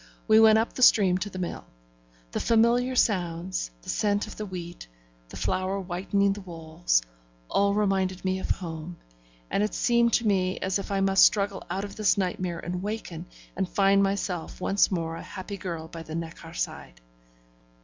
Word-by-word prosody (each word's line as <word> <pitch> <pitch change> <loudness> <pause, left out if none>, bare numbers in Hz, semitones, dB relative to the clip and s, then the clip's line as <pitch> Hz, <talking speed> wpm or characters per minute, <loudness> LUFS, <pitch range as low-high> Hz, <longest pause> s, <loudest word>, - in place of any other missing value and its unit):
We 220 0 +6
went 220 -1 +7
up 225 +1 0
the - - -6
stream 190 -7 +6
to 205 - -3
the 185 - -9
mill. 180 -2 -4 0.7
The - - -2
familiar 235 +3 +3
sounds, 180 - 0
the - - -10
scent 205 -1 +1
of 215 - -10
the 215 - -5
wheat, 175 - -8 0.4
the - - -9
flour 190 +1 -1
whitening 195 +2 0
the 205 - -8
walls 160 - -1 0.5
all 200 0 +2
reminded 190 -3 0
me 190 0 0
of - - -5
home, 165 -1 -4 0.5
and - - +1
it 210 - -1
seemed 235 -1 +3
to 235 - +2
me 185 -3 +1
as 190 +1 -1
if - - -6
I 195 -1 +1
must 195 0 +5
struggle 200 -2 +3
out 195 - -2
of 200 -1 -8
this 210 -2 +3
nightmare 180 -2 -2
and 180 +1 -4
waken, 190 -5 -5 0.3
and 190 -2 -2
find 195 0 +4
myself 195 -4 -2
once 195 +1 +2
more 165 -3 -2
a - - -7
happy 195 +2 -7
girl 165 -4 -5
by 165 0 -8
the 160 0 -7
Neckar 165 0 -7
side. - - -5
190 Hz, 180 wpm, -27 LUFS, 175-205 Hz, 0.7 s, went